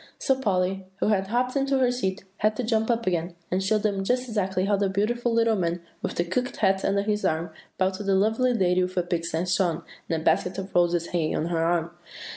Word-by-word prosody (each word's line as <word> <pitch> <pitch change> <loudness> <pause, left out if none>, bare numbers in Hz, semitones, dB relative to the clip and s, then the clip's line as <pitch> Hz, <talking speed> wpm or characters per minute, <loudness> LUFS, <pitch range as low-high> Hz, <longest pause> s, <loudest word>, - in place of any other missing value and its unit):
So 270 - +2
Polly, 190 -6 -1
who - - +1
had 195 -2 +1
hopped 250 +4 0
into 275 0 +1
her 255 -2 +3
seat, 195 -6 -2
had 215 0 +1
to 250 - -2
jump 220 -1 +1
up 235 -1 +1
again, 175 -1 -1 0.2
and 185 +1 +1
show 215 +3 +2
them 205 -2 -1
just 250 +5 0
exactly 190 -4 0
how 205 0 +2
the 200 0 +1
beautiful 235 +5 0
little 230 -1 +3
man, 175 -2 -1 0.2
with - - -3
the 170 - +1
cocked 250 +9 -2
hat 195 -2 +2
under 200 0 +1
his 210 0 -1
arm, 160 +1 0 0.3
bowed 190 0 +1
to 190 - -6
the 195 -1 +2
lovely 220 +6 +2
lady 185 -3 +2
with 185 +1 -2
a 180 - +3
pink 175 -1 -2
sash 175 +4 0
on, 170 -4 0 0.3
and 165 - 0
a 160 - -9
basket 180 +3 +2
of 195 0 -6
roses 175 -1 +2
hanging 165 -3 0
on 155 - -1
her 165 -1 0
arm. 170 0 +1
195 Hz, 240 wpm, -26 LUFS, 180-220 Hz, 0.3 s, her